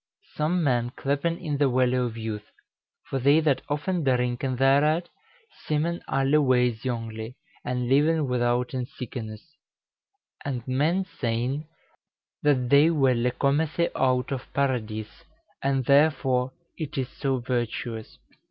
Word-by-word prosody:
Some 165 +3 0
men 120 -4 +1
clepen 145 +5 -1
it 145 -2 -1
the 145 -2 +4
Welle 125 0 +2
of 115 - -7
Youthe: 110 -2 -5 0.5
for 135 - -3
thei 140 +4 +5
that 140 -4 +2
often 155 +4 -1
drynken 125 0 0
thereat, 145 +6 +3 0.6
semen 160 +3 0
alle 135 +3 +2
weys 125 -4 +2
yongly, 115 -2 -4 0.3
and 125 -1 -2
lyven 150 +4 +3
withouten 125 0 0
sykenesse. 120 0 -8 0.9
And 130 -3 -4
men 155 +9 +1
seyn, 125 +5 -1 0.7
that 130 -4 +2
that 150 +4 +6
welle 125 -4 +3
comethe 155 +4 +1
out 130 0 +1
of 135 -1 -5
Paradys: 110 -6 -2 0.4
and 135 -2 0
therefore 135 -3 +3 0.3
it 155 -4 -5
is 130 -2 0
so 135 -2 -1
vertuous." 120 -2 -3
130 Hz, 125 wpm, -26 LUFS, 125-145 Hz, 0.9 s, that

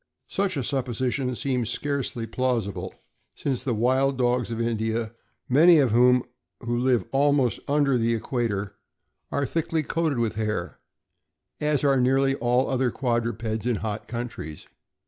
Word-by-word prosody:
Such 195 -5 -1
a 135 - -1
supposition 130 0 -1
seems 125 -3 -1
scarcely 135 -3 -2
plausible, 115 -4 -2 0.4
since 135 -4 -2
the 125 -4 -1
wild 130 +4 +2
dogs 125 -1 +1
of 115 -1 -4
India, 115 -1 -1 0.3
many 160 +6 +6
of 135 -6 +3
whom 125 +2 +5 0.4
live 120 -3 +1
almost 135 -4 +2
under 140 -3 +2
the 115 0 +1
equator, 105 -4 -2 0.6
are 140 - 0
thickly 160 +2 -1
coated 160 -2 -1
with 115 -2 0
hair, 110 -1 -3 0.8
as 150 -2 +1
are 135 -2 +3
nearly 135 +2 +3
all 125 0 +1
other 130 -1 +1
quadrupeds 115 -3 -2
in 120 - +2
hot 105 +1 -4
countries. 115 -11 -6
125 Hz, 135 wpm, -25 LUFS, 115-135 Hz, 0.8 s, many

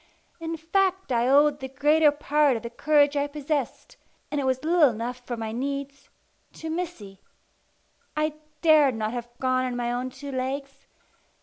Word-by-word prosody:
In 330 0 -4
fact 375 +1 0
I 240 0 +2
owed 290 +2 +4
the 265 - -5
greater 295 +4 +4
part 295 -2 +2
of 225 - -9
the 235 - -6
courage 290 +2 +3
I 285 0 +1
possessed 290 -2 -4 0.3
and 295 -1 0
it - - -2
was 260 +1 0
little 325 -2 +5
enough 240 +2 -4
for 240 - -3
my 220 -1 -4
needs 275 +3 -4 0.4
to 320 0 -6
Missy. 315 - -5 1.0
I 305 0 +1 0.3
dared 300 -6 +5
not 215 -1 -2
have 240 -1 -5
gone 255 0 +1
on 250 -1 -3
my 240 0 -1
own 250 +1 -2
two 275 +2 -9
legs. 275 +1 -4
280 Hz, 170 wpm, -26 LUFS, 250-300 Hz, 1.0 s, little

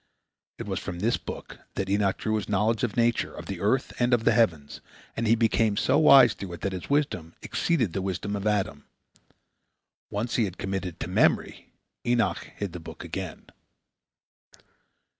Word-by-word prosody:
It - - -6
was - - -2
from 85 - -6
this 110 +7 +1
book - - -8 0.2
that 95 - -2
Enoch 100 0 +1
drew 110 - -2
his 105 - -5
knowledge 105 +3 +1
of 115 -3 -1
nature, 120 0 +2
of - - -8
the 95 -3 -5
earth 115 +8 +1
and 120 0 +4
of 115 - -3
the - - +4
heavens, 80 -11 +1 0.3
and 115 0 -1
he 115 - +5
became 110 -2 +2
so 130 - +3
wise 135 -7 +8
through 95 -3 -7
it 85 - -9
that 100 - -1
his 90 - -6
wisdom 140 - 0
exceeded 125 - 0
the 95 - -1
wisdom 95 +2 -3
of 100 +1 -2
Adam. 105 -2 -1 1.2
Once 110 +4 -2
he 115 - +3
had 95 -2 -6
committed 95 -2 -3
it - - -38
to - - -2
memory, - - +1 0.3
Enoch 120 -2 +1 0.2
hid 100 -4 -4
the 90 - -6
book 80 - -10
again. - - -6
105 Hz, 180 wpm, -27 LUFS, 95-120 Hz, 1.2 s, wise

